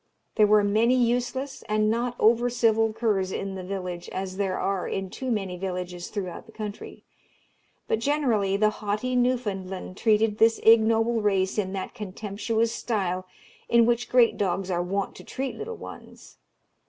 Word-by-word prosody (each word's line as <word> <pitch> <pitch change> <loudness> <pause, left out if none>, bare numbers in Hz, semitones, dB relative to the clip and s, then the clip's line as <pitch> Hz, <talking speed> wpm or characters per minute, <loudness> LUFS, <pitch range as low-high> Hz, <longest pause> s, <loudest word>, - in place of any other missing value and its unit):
There 210 - +4
were 210 0 +5
many 220 +5 +3
useless 250 +3 0
and 215 0 +2
not 240 +2 -1
over 235 +2 +4
civil 225 -2 +2
curs 215 -4 0
in 195 0 -3
the 190 - -5
village, 180 -2 -5
as 190 0 -5
there 195 -2 -1
are 195 -2 -1
in 195 -1 -3
too 260 - -5
many 195 -6 -2
villages 180 -1 -4
throughout 195 +1 -6
the - - -14
country; 210 -2 -7 0.8
but 220 - +1
generally 230 -8 +1
the 215 +1 +3
haughty 215 +5 -1
Newfoundland 205 -8 -1
treated 215 -1 +2
this 225 0 +5
ignoble 225 +1 +4
race 195 -1 +1
in 190 -2 -2
that 190 -1 -4
contemptuous 220 +3 -2
style 185 -6 -2 0.4
in 235 -1 +5
which 240 0 0
great 245 -2 +4
dogs 190 -1 -1
are 175 -1 +1
wont 195 +2 -2
to - - -11
treat 265 -1 -4
little 460 +1 -6
ones. - - -12
215 Hz, 160 wpm, -26 LUFS, 190-235 Hz, 0.8 s, were